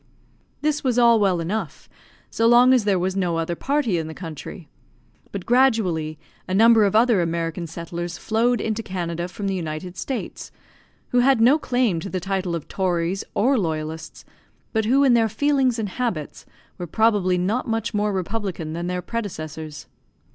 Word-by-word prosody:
This 300 0 0
was 250 -3 +1
all 235 -2 +6
well 190 -4 +2
enough 180 +1 -4 0.4
so 230 - +2
long 245 +2 +6
as 245 -5 +3
there 200 -2 +3
was 185 +1 -1
no 180 -4 0
other 165 +1 -1
party 265 - 0
in 160 - -4
the 160 - -8
country. 165 0 -8 0.6
But 195 -3 -6
gradually 215 - +2 0.3
a 185 - -1
number 225 0 +6
of 200 - 0
other 225 -3 +4
American 165 0 -2
settlers 170 +1 -6
flowed 235 +2 +1
into 220 0 -2
Canada 175 -4 -4
from 200 +3 -7
the 195 - 0
United 175 0 -5
States, 255 +8 -5 0.6
who 245 - +2
had 260 0 +4
no 255 +7 +5
claim 245 - +1
to 195 - -6
the 185 - -2
title 190 -1 -2
of 165 - -6
tories 180 0 -1
or 255 +3 +3
loyalists, 160 -2 -4 0.5
but 220 -1 +1
who 265 +5 +4
in 265 -3 +5
their 225 -2 +3
feelings 265 +1 +1
and 215 -3 -2
habits 190 - -4 0.3
were 175 - -4
probably 205 -2 +2
not 200 +8 -1
much 225 0 -2
more 210 0 +1
republican 190 -4 -3
than 170 +1 -4
their 180 0 -3
predecessors. 155 -9 -6
195 Hz, 170 wpm, -23 LUFS, 170-230 Hz, 0.6 s, all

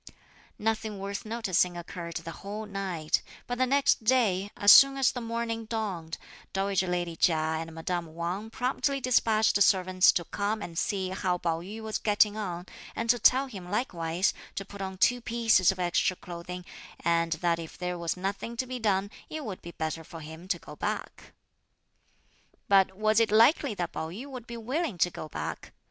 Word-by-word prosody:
Nothing 220 -1 -1
worth 200 +3 -5
noticing 185 -6 +1
occurred 170 0 -7
the 165 0 -5
whole 210 +2 -5
night; 190 -6 -1 0.2
but 245 0 -4
the 255 - +3
next 275 -3 +3
day, 215 -5 +2
as 205 - +7
soon 275 0 +9
as 270 -1 +3
the 245 - -5
morning 230 0 -3
dawned, 195 -8 -3 0.4
dowager 195 -1 +1
lady 175 -1 -1
Chia 165 0 +3
and 160 +1 -2
madame 165 0 -4
Wang 180 +6 -3
promptly 265 +4 -1
despatched 220 -5 +3
servants 185 -1 +5
to 170 - -1
come 205 +4 -2
and 170 -5 -7
see 190 +2 -1
how 185 -1 -1
Pao 165 -1 -1
yü 210 +5 -8
was 220 -1 -3
getting 210 0 +3
on; 180 -5 -4 0.3
and 230 0 +2
to 245 - 0
tell 260 +4 +5
him 195 -9 -9
likewise 180 -4 0 0.2
to 195 - -4
put 200 +1 -10
on 190 -1 -4
two 245 +5 +3
pieces 225 -6 +3
of 190 - -7
extra 180 +1 +1
clothing, 175 +1 -8 0.4
and 165 -1 +2
that 170 +1 0
if 165 -1 -8
there 180 -1 -3
was 170 +1 -2
nothing 200 +5 -4
to 255 - -1
be 255 0 -5
done 200 -2 +1 0.2
it 310 -2 -5
would 195 -4 -6
be 170 - -9
better 160 -1 -4
for 165 +1 -10
him 160 +3 -10
to 190 - 0
go - - -11
back. - - -4 1.4
But 190 -1 +4
was 215 +1 +3
it 230 - +3
likely 230 +2 +5
that 175 -3 -3
Pao 160 - -4
yü 210 +11 -7
would 255 -4 -9
be 235 - -6
willing 255 - -2
to 180 +1 +2
go 155 - -7
back? - - -6
195 Hz, 185 wpm, -28 LUFS, 175-225 Hz, 1.4 s, soon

